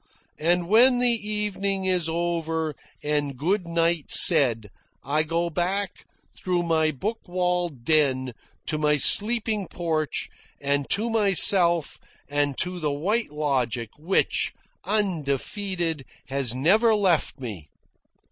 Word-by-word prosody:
And 175 +2 0
when 245 +5 +5
the 235 -4 +2
evening 200 -2 -2
is 180 -3 0
over 165 -2 -3 0.3
and 145 -2 -2
good 180 +6 -2
night 170 -2 -1
said, 120 - +6 0.3
I 145 +3 0
go 165 +2 -3
back 185 +4 -4 0.3
through 180 -1 -2
my 160 -2 0
book 205 - -5
walled 180 -7 -3
den 130 -5 0 0.3
to 155 - -3
my 150 -1 +1
sleeping 215 - +1
porch 160 -3 -3 0.3
and 140 0 -2
to 220 +3 +1
myself 185 -6 +5 0.3
and 145 -1 -2
to 180 0 -2
the 150 -3 -2
White 195 +11 -2
Logic 130 -6 -3
which, 165 +6 -1 0.3
undefeated, 175 -2 -2 0.3
has 135 -3 0
never 215 - +2
left 185 -8 0
me. 100 - -9
170 Hz, 120 wpm, -23 LUFS, 145-195 Hz, 0.3 s, said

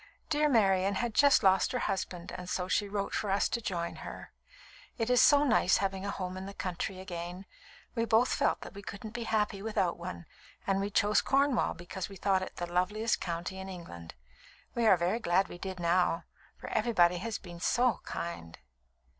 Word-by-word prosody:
"Dear 300 0 +3
Marian 195 -5 +3
had 235 +3 -1
just 280 0 +5
lost 190 +4 +4
her - - +1
husband, 180 -2 -3
and 180 0 -7
so 180 0 -1
she 205 +2 +1
wrote 200 0 -2
for 210 - -1
us 195 +1 +2
to 235 - -2
join 170 -5 -3
her. - - -9 0.7
It 230 0 0
is 250 - +6
so 290 -1 +6
nice 220 -8 +4
having 195 0 -2
a - - -1
home 185 -2 -4
in 190 +1 -6
the 200 - -8
country 185 +1 -4
again. 180 0 -6 0.5
We 230 -2 0
both 230 +2 +3
felt - - 0
we 200 - -9
couldn't 200 +2 -8
be 240 -1 -4
happy 210 -3 0
without 195 -5 -1
one, 175 0 -6 0.4
and 195 0 +1
we 200 - -1
chose 205 +1 +3
Cornwall 275 -2 +2
because 175 +2 -6
we 195 - -10
thought 190 0 +1
it 185 - -6
the 175 - -3
loveliest 185 +6 0
county 175 +2 -4
in 190 0 -6
England. 85 - -9 0.6
We 235 -1 +1
are 190 - +7
very 175 +7 0
glad 190 -2 +2
we 175 - -9
did, 190 -1 -5
now, 175 0 +2 0.3
for - - -9
everybody 180 -6 +3
has 225 +3 -3
been 175 -2 -11
so 245 +6 +2
kind." 85 - -6
195 Hz, 195 wpm, -31 LUFS, 180-220 Hz, 0.7 s, are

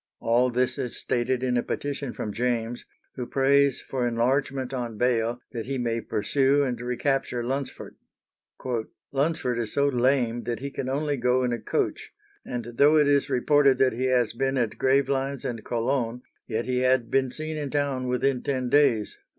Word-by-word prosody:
All 120 +2 +2
this 125 +3 0
is 125 -3 -4
stated 125 +1 -1
in 125 -1 +1
a - - +2
petition 140 -1 -4
from 105 -3 -5
James, 120 +1 -2 0.3
who 125 -2 -5
prays 140 0 +3
for 125 -2 -2
enlargement 130 +2 0
on 120 -4 -4
bail 120 0 +1
that 115 -1 -5
he 135 0 -2
may 115 -2 -1
pursue 135 +7 +1
and 125 -3 -2
recapture 125 0 -1
Lunsford. 135 +3 -4 1.1
"Lunsford 140 -4 0
is 115 -2 -3
so 140 0 +2
lame 125 -2 +1
that 120 -2 -2
he 140 +2 -5
can 130 -1 -4
only 145 +1 -1
go 125 +1 +2
in 125 -1 0
a 120 - -2
coach, - - -2 0.3
and 120 -2 -5
though 150 +2 +6
it 150 -1 +4
is 140 -1 +2
reported 140 +1 +4
that 130 -2 +3
he 125 +3 -2
has 125 -3 +2
been 135 +3 0
at 115 -4 -1
Gravelines 135 +1 +1
and 115 -4 -4
Cologne, 120 0 -1 0.2
yet 115 0 -2
he 125 0 0
had 130 -2 +2
been 135 -1 +2
seen 155 +4 -4
in 150 -2 -3
town 140 -3 -1
within 125 +1 +1
ten 130 -3 -2
days." 120 -7 +2
130 Hz, 175 wpm, -26 LUFS, 120-140 Hz, 1.1 s, though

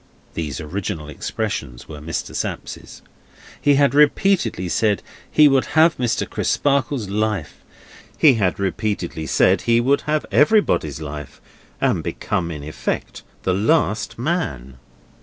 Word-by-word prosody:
(Those 75 -4 -4
original 80 -1 -4
expressions 75 - -4
were 75 -2 -9
Mr. 80 +2 -5
Sapsea's.) - - -6 0.6
He 145 -1 +4
had 140 0 +3
repeatedly 150 - +2
said 105 +2 +1 0.3
he 150 -1 +6
would 135 -2 +3
have 160 +1 +6
Mr. 125 -2 0
Crisparkle's 135 -5 0
life. 105 -5 -2 0.6
He 150 -4 +6
had 100 -7 0
repeatedly 95 -5 -2
said - - +3
he 115 0 +3
would 135 +4 +2
have 155 0 +1
everybody's 145 - +2
life, 75 -2 -7 0.4
and - - +1
become 85 -2 -2
in 75 -4 -6
effect 75 +1 -4 0.2
the 95 - +1
last 110 - +1
man. 70 - -3
105 Hz, 125 wpm, -21 LUFS, -, 0.6 s, he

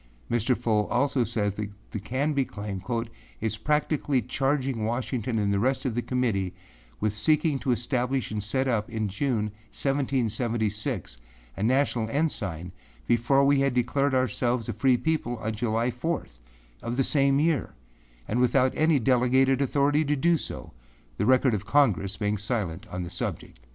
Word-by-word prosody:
â - - +2
Mr. 120 +2 +2
Fow 110 -3 +1
also 135 +1 +1
says 105 -3 -1
that 105 0 -4 0.2
the 105 - -3
Canby 135 +7 0
claim 100 -5 -6
âis 110 - -5
practically 150 -2 +1
charging 135 -2 -1
Washington 120 0 -2
and 100 -2 +1
the 100 - +1
rest 130 +4 0
of 130 - 0
the 120 - -1
Committee 115 -8 -1 0.4
with 105 0 -1
seeking 150 +5 +2
to 130 - -4
establish 125 +1 -1
and 105 -1 -2
set 130 +6 0
up 115 -4 0
in 110 -2 -2
June, 105 +1 -1 0.2
1776, 115 - -1 0.4
a - - -6
national 120 -1 +1
ensign 100 - -2 0.3
before 125 +4 +3
we 140 0 +4
had 135 -2 +1
declared 135 +3 +1
ourselves 125 -1 0
a 120 - -2
free 125 +4 +3
people 150 -5 -1
on 110 0 -3
July 115 +2 0
4, 160 +7 -2 0.6
of 120 +1 -4
the 135 - +3
same 140 0 +3
year, 155 - 0 0.5
and 115 - 0
without 125 +1 +3
any 155 -1 +3
delegated 130 +2 +3
authority 145 +2 +2
to 150 0 +1
do 170 +5 +3
so, 155 - -6 0.5
the - - 0
record 130 -1 +4
of 105 0 -3
Congress 105 - +2
being 105 0 -1
silent 100 -6 -3
on 90 0 -5
the 85 - -7
subject. 85 -7 -5
120 Hz, 160 wpm, -27 LUFS, 110-135 Hz, 0.6 s, we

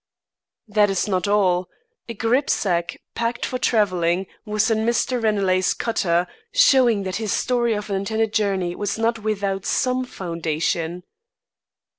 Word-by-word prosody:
"That 210 -1 +3
is 195 +1 0
not 185 -2 0
all. 185 -3 +2 0.4
A 230 - -5
grip 240 +6 +1
sack, 175 -4 0
packed 230 0 -2
for 255 - -3
travelling, 185 -6 +1 0.2
was 215 +1 +1
in 220 - +2
Mr. 235 +2 0
Ranelagh's 195 -4 +2
cutter, 175 -6 0 0.3
showing 255 - +4
that 185 -1 -3
his 220 -1 -3
story 240 -2 +1
of 210 0 -5
an 195 - +1
intended 220 +2 -1
journey 195 -5 0
was 205 +3 -3
not 225 0 0
without 200 -3 -2
some 255 +4 0
foundation." 170 -2 -3
205 Hz, 140 wpm, -22 LUFS, 185-225 Hz, 0.4 s, showing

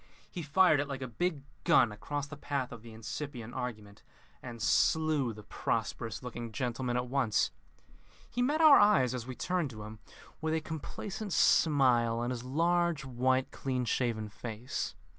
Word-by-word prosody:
He 175 - -5
fired 155 +1 +4
it 145 - -1
like 135 -2 -5
a - - -4
big 140 +5 -2 0.2
gun 120 - +5
across 145 +7 -4
the 155 - -9
path 140 -3 -3
of 120 -3 -9
the 115 0 -12
incipient 115 +2 -6
argument, 110 -5 -6 0.4
and 120 -1 -8
slew 150 +2 +2
the 105 -1 -10
prosperous 110 +1 -3
looking 120 -2 -6
gentleman 125 +1 -2
at 125 - -1
once. 125 - +1 0.8
He 245 - -3
met 295 +6 +2
our 310 -3 +9
eyes, 200 - +4
as 125 -1 -5
we 130 - -5
turned 180 -2 -1
to 110 -4 -9
him, 110 +1 -9 0.4
with 160 0 0
a - - +1
complacent 185 +6 -6
smile 125 -7 +4
on 120 +1 -1
his 125 -1 -4
large 165 +2 +1
white, 130 +1 +1
clean 130 -2 -2
shaven 115 -2 -1
face. 115 +3 -5
130 Hz, 165 wpm, -31 LUFS, 115-155 Hz, 0.8 s, our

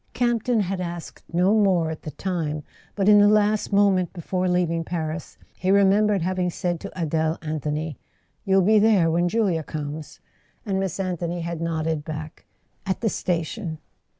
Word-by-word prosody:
Campton 240 -1 +1
had 190 -1 -2
asked 170 -1 -6
no 180 +4 +3
more 185 -7 +3
at 160 - -7
the - - -6
time; 155 -2 -3 0.3
but 195 -1 0
in 210 -1 +8
the 205 - +6
last 210 0 +2
moment 195 -3 +3
before 185 +1 -2
leaving 170 -2 +1
Paris 160 -1 -4 0.2
he 185 - -1
remembered 200 0 +4
having 185 0 0
said 175 0 -2
to - - -7
Adele 160 0 0
Anthony: 155 -1 -3 0.4
"You'll 195 -1 +3
be 215 +3 +5
there 205 -6 +4
when 175 +2 +2
Julia 195 -6 +1
comes?" 150 0 -6 0.5
and 195 -3 -1
Miss 190 -1 -2
Anthony 175 -2 -2
had 170 -1 -4
nodded 160 -2 -1
back: 155 0 -7 0.4
"At 190 +2 -2
the 225 - +2
station." 170 -1 -2
175 Hz, 160 wpm, -24 LUFS, 160-195 Hz, 0.5 s, in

